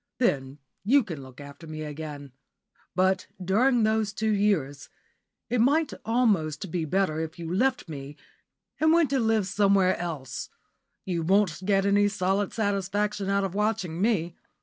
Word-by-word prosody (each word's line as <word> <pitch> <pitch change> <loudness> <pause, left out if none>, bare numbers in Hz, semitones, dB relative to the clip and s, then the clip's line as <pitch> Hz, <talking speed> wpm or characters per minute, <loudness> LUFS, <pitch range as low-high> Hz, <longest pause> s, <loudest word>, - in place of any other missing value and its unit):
Then 135 - 0 0.3
you 265 +7 +4
can 165 -9 -7
look 130 0 -13
after 145 +3 -11
me 155 0 -6
again. 150 -2 -7 0.6
But, 185 0 +2
during 225 +7 +2
those 220 -1 +1
two 220 +2 0
years, 190 -10 0 0.6
it 245 -2 +1
might 290 +5 +2
almost 195 - +1
be 170 -2 -1
better 160 -1 0
if 160 0 -5
you 170 0 -5
left 255 +4 +1
me 145 -1 -8 0.6
and 315 +1 +4
went 330 -4 +3
to 275 - +2
live 225 -3 +2
somewhere 195 -1 +3
else. 155 -8 -5 0.6
You 175 -3 -1
won't 190 +1 +2
get 195 -1 +2
any 205 +1 +4
solid 195 0 0
satisfaction 205 -1 -1
out 200 0 +2
of 190 -2 -3
watching 195 -5 -1
me. 185 -6 +1
195 Hz, 150 wpm, -27 LUFS, 160-215 Hz, 0.6 s, you